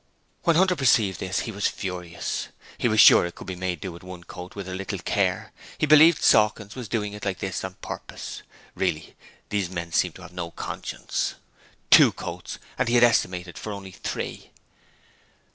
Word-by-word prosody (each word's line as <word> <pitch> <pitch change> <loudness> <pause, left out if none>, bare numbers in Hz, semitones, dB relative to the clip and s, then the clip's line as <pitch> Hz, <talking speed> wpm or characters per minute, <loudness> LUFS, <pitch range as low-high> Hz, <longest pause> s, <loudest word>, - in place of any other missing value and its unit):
When 170 - +4
Hunter 185 +2 +4
perceived 115 - +3
this 95 0 -1
he 115 - -5
was 100 -1 0
furious. 90 -3 -4 0.3
He - - 0
was 110 -2 +2
sure - - +9
it 85 0 -5
could - - -10
be 95 - -5
made 90 0 -2
to 80 - -23
do 95 - -4
with 85 - -11
one 90 -1 -10
coat 90 +1 -10
with 100 -2 -6
a 95 - -5
little 95 0 -4
care; - - -1 0.3
he - - +1
believed 155 +2 +6
Sawkins 105 -1 +3
was 125 -3 -7
doing 105 -2 -2
it 105 - -9
like 95 -2 -2
this 95 -3 -4
on 95 0 -5
purpose. - - -7 0.3
Really, 75 0 -2 0.3
these 100 -4 -1
men 85 -2 -5
seemed 90 0 +1
to 90 - -12
have 90 -1 -12
no 85 -2 -4
conscience. - - -4 0.6
Two - - +9
coats! - - -7 0.2
and - - +1
he 120 - +2
had 120 - +6
estimated 90 -6 +1
for 105 - -5
only 100 -2 -7
three. - - -5
95 Hz, 195 wpm, -25 LUFS, 90-110 Hz, 0.6 s, sure